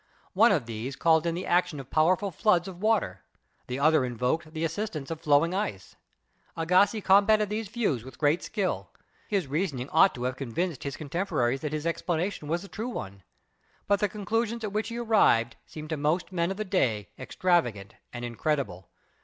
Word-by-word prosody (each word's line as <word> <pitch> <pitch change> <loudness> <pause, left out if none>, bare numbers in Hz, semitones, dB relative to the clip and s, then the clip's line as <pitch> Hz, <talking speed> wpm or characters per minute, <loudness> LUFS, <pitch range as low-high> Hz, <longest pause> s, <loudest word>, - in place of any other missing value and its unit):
One 220 +4 +6
of 155 -11 +1
these 115 +4 -5
called 160 0 +3
in 165 - 0
the 180 - -4
action 175 -4 +1
of 135 -1 -10
powerful 185 +5 +2
floods 180 +1 +2
of 185 -1 -9
water, 210 - +1 0.5
the 125 - -3
other 155 0 +4
invoked 125 +6 -1
the 160 0 -4
assistance 165 -4 -4
of 160 -1 -5
floating 155 +2 +3
ice. 185 - -4 0.6
Agassiz 185 +6 +3
combated 205 +2 +4
these 215 0 -2
views 200 - -1
with 130 -1 -12
great 150 +3 +2
skill. 195 -3 -2 0.4
His 200 -6 0
rea 155 +8 0
soning 130 -4 -6
ought 190 +5 +5
to 125 - -5
have 125 0 -2
convinced 145 +5 -3
his 140 - -4
contemporaries 145 -5 -1
that 150 - -3
his 155 0 -3
explanation 170 0 -2
was 170 +4 -1
the - - -9
true 225 +5 -5
one. 100 - -6 0.7
But 200 -1 +3
the 210 - +1
conclusions 225 +3 -2
at 205 -2 -3
which 215 +1 -1
he 230 - -5
arrived 220 - +3
seemed 155 0 -9
to 160 - -1
most 155 +6 0
men 170 -1 0
of 195 - -4
the 215 - -3
day 125 - 0
extrava 130 - -6
8o - - -14
GEOLOGY 170 -9 +4
gant 100 +2 -12 0.2
and 120 0 -5
incredible. 120 - -2
165 Hz, 195 wpm, -27 LUFS, 135-195 Hz, 0.7 s, One